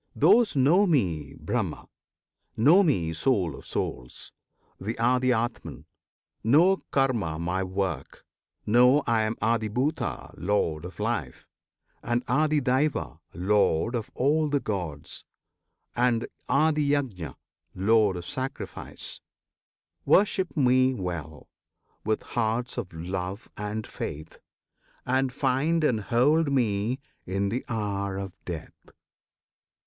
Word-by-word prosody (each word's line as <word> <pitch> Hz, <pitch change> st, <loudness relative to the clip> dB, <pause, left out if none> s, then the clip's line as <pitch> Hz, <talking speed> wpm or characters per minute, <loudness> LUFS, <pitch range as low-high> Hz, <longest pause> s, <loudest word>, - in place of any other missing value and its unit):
Those 235 Hz, -7 st, +5 dB
know 165 Hz, +10 st, +4 dB
Me 85 Hz, -, 0 dB
BRAHMA; -, -, -3 dB, 0.7 s
know 155 Hz, -, +6 dB
Me 90 Hz, -, +1 dB
Soul 90 Hz, -, +1 dB
of -, -, -12 dB
Souls, 60 Hz, 0 st, -4 dB, 0.5 s
The 110 Hz, +4 st, -3 dB
ADHYATMAN; 120 Hz, 0 st, 0 dB, 0.6 s
know 165 Hz, -, +5 dB
KARMA, 120 Hz, -, +1 dB
my 90 Hz, +3 st, -1 dB
work; 95 Hz, -7 st, -4 dB, 0.4 s
Know 125 Hz, +6 st, +5 dB
I 115 Hz, -1 st, +2 dB
am 110 Hz, +1 st, -1 dB
ADHIBHUTA, 115 Hz, +6 st, -1 dB
Lord 85 Hz, -3 st, 0 dB
of 90 Hz, -, -10 dB
Life, 105 Hz, -, -3 dB, 0.5 s
And 120 Hz, +1 st, -1 dB
ADHIDAIVA, 145 Hz, +1 st, +1 dB, 0.2 s
Lord 95 Hz, +2 st, +2 dB
of 115 Hz, -3 st, -3 dB
all 150 Hz, +3 st, +2 dB
the 145 Hz, 0 st, +1 dB
Gods, 90 Hz, -, -4 dB, 0.7 s
And 120 Hz, -1 st, +2 dB, 0.2 s
ADHIYAJNA, 145 Hz, -, +1 dB, 0.4 s
Lord 105 Hz, +1 st, +3 dB
of 85 Hz, -, -7 dB
Sacrifice; 130 Hz, +7 st, -5 dB, 0.8 s
Worship 190 Hz, -3 st, +2 dB
Me 130 Hz, -1 st, +4 dB
well, 80 Hz, -, -5 dB, 0.6 s
with 110 Hz, 0 st, -1 dB
hearts 120 Hz, +2 st, -1 dB
of 100 Hz, -6 st, -6 dB
love 90 Hz, +4 st, -5 dB
and 105 Hz, +1 st, -4 dB
faith, 75 Hz, +2 st, -7 dB, 0.7 s
And 130 Hz, +1 st, +1 dB
find 140 Hz, +5 st, +1 dB
and 115 Hz, -7 st, +2 dB
hold 140 Hz, +8 st, +2 dB
me 115 Hz, -1 st, +1 dB, 0.3 s
in 100 Hz, +2 st, 0 dB
the 120 Hz, +5 st, -2 dB
hour 100 Hz, -3 st, -2 dB
of 95 Hz, -2 st, -5 dB
death. 85 Hz, -3 st, -8 dB
115 Hz, 105 wpm, -27 LUFS, 95-135 Hz, 0.8 s, know